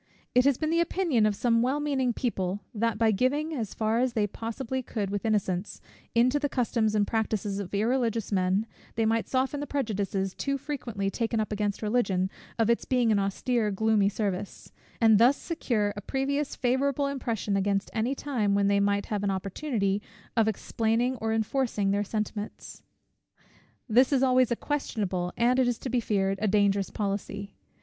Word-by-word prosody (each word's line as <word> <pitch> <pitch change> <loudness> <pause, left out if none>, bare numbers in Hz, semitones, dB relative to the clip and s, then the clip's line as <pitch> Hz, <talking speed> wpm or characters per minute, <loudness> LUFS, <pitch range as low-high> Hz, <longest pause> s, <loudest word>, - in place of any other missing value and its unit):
It 250 +1 +4
has 280 -3 +4
been 310 0 -1
the 335 - +2
opinion 335 - +2
of 210 - 0
some 230 +1 +2
well 260 +4 +1
meaning 275 -4 0
people, 200 -5 -2
that 230 0 0
by 225 0 +3
giving, 285 +9 0
as 225 -8 -4
far 220 +1 +1
as 250 -1 +1
they 215 -2 +2
possibly 230 +5 -4
could 210 -5 -3
with 205 +2 -3
innocence, 195 -3 -1 0.4
into 250 +5 +4
the 285 -1 -1
customs 230 -4 0
and 205 -1 +3
practices 215 -2 -1
of 195 -3 -5
irreligious 230 +1 0
men, 190 +2 +1 0.3
they 225 - +1
might 225 +1 +1
soften 265 +2 0
the 290 - -4
prejudices 200 -8 -1
too 275 0 -2
frequently 235 -9 -3
taken 230 0 -1
up 215 - -2
against 210 0 -2
Religion, 200 -4 +1 0.3
of 225 -2 +2
its 235 0 +2
being 245 -3 +2
an 205 - +3
austere 210 +3 0
gloomy 210 0 +2
service; 205 -2 -4 0.3
and 220 -3 +6
thus 250 +5 +5
secure 220 -11 -1
a 205 - -6
previous 275 +5 -1
favourable 270 +2 +1
impression 235 -7 -2
against 195 0 0
any 235 +5 0
time, 230 -9 0
when 200 0 +2
they 200 0 +3
might 200 0 +1
have 210 -2 -2
an 200 - +1
opportunity 200 +1 -1 0.3
of 225 -2 +3
explaining 225 +3 0
or 225 0 -2
enforcing 220 -2 0
their 205 +1 +1
sentiments. 210 0 -5 1.1
This 250 +4 +4
is 270 -2 +3
always 255 -1 +4
a - - +3
questionable, 200 -11 -2
and, 245 +2 +3
it 255 - +3
is 245 -2 0
to 260 - -5
be 250 - +2
feared, 195 -3 0
a 215 - +2
dangerous 200 -1 +2
policy. 200 -1 -4
220 Hz, 180 wpm, -28 LUFS, 200-255 Hz, 1.1 s, and